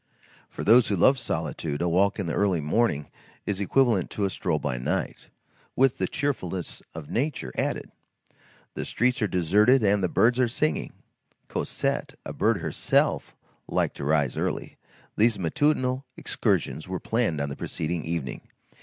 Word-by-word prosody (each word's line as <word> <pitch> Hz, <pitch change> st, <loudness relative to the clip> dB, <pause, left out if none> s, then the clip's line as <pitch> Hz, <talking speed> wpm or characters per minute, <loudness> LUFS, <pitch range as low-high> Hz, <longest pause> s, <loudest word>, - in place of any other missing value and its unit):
For -, -, -6 dB
those 120 Hz, +2 st, +6 dB
who 100 Hz, -, +1 dB
love 130 Hz, +9 st, +4 dB
solitude, 80 Hz, -, -3 dB
a 90 Hz, -, 0 dB
walk 95 Hz, +4 st, +2 dB
in 100 Hz, -, -2 dB
the 80 Hz, -, -2 dB
early 95 Hz, -4 st, +2 dB
morning 75 Hz, -1 st, 0 dB, 0.3 s
is 100 Hz, -1 st, -2 dB
equivalent 115 Hz, -3 st, +2 dB
to 100 Hz, -, -1 dB
a 95 Hz, -, -1 dB
stroll -, -, -1 dB
by 60 Hz, -, -3 dB
night, 60 Hz, -, -3 dB, 0.5 s
with 135 Hz, -1 st, +3 dB
the -, -, +1 dB
cheerfulness 110 Hz, -, -3 dB
of 80 Hz, -3 st, -8 dB
nature 130 Hz, -, -1 dB
added. -, -, -2 dB, 0.8 s
The -, -, -4 dB
streets 125 Hz, +1 st, 0 dB
are 105 Hz, -, +2 dB
deserted 105 Hz, +8 st, +4 dB
and 100 Hz, 0 st, +3 dB
the 90 Hz, -, +1 dB
birds 120 Hz, +7 st, +3 dB
are 125 Hz, -, +4 dB
singing. 80 Hz, -9 st, -1 dB, 0.6 s
Cosette, -, -, -2 dB
a -, -, -5 dB
bird -, -, +1 dB
herself, -, -, +1 dB, 0.3 s
liked -, -, 0 dB
to -, -, -5 dB
rise 75 Hz, -3 st, +1 dB
early. -, -, -3 dB, 0.4 s
These 110 Hz, 0 st, +3 dB
matutinal 130 Hz, -, +1 dB
excursions 80 Hz, -, -1 dB
were 95 Hz, -1 st, -3 dB
planned 110 Hz, -10 st, 0 dB
on 70 Hz, 0 st, -1 dB
the 70 Hz, -, -5 dB
preceding 80 Hz, +1 st, -3 dB
evening. 80 Hz, -6 st, -3 dB
100 Hz, 160 wpm, -26 LUFS, 80-120 Hz, 0.8 s, those